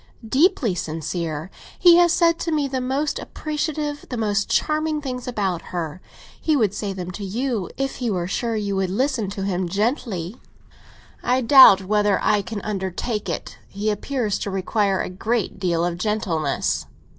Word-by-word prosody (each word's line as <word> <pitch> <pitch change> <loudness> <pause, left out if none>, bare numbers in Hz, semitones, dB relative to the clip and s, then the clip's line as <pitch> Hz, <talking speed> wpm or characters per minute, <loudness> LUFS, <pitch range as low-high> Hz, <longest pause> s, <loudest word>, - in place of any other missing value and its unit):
"Deeply 270 - +3
sincere. 165 0 -4 0.3
He 345 -1 +7
has 350 -1 +5
said 335 -1 +3
to 335 - -2
me 300 -3 +1
the 260 -1 -2
most 275 +4 -1
appreciative, 300 -1 -3
the 250 - -4
most 210 -2 0
charming 310 0 +1
things 255 -4 -5
about 195 -8 -1
her. 170 0 -5 0.4
He 315 - +2
would 215 -8 +2
say 205 -1 -3
them 185 -2 -5
to 200 +3 -7
you, 220 -1 -2
if 270 0 -2
he 245 -2 -2
were 180 -4 -1
sure 230 +5 -2
you 205 -2 -1
would 190 -1 0
listen 235 0 0
to 200 -1 -5
him—gently." 195 - -1 0.8
"I 255 +1 +1
doubt 230 -7 +8
whether 210 0 +2
I 210 -1 +2
can 205 +1 -6
undertake 205 +2 -3
it. - - -5
He 210 +2 -2
appears 215 0 -2
to - - -3
require 195 0 0
a - - -4
great 215 +3 -2
deal 175 -3 +1
of 175 0 -3
gentleness." 180 -8 -1
210 Hz, 165 wpm, -22 LUFS, 190-265 Hz, 0.8 s, doubt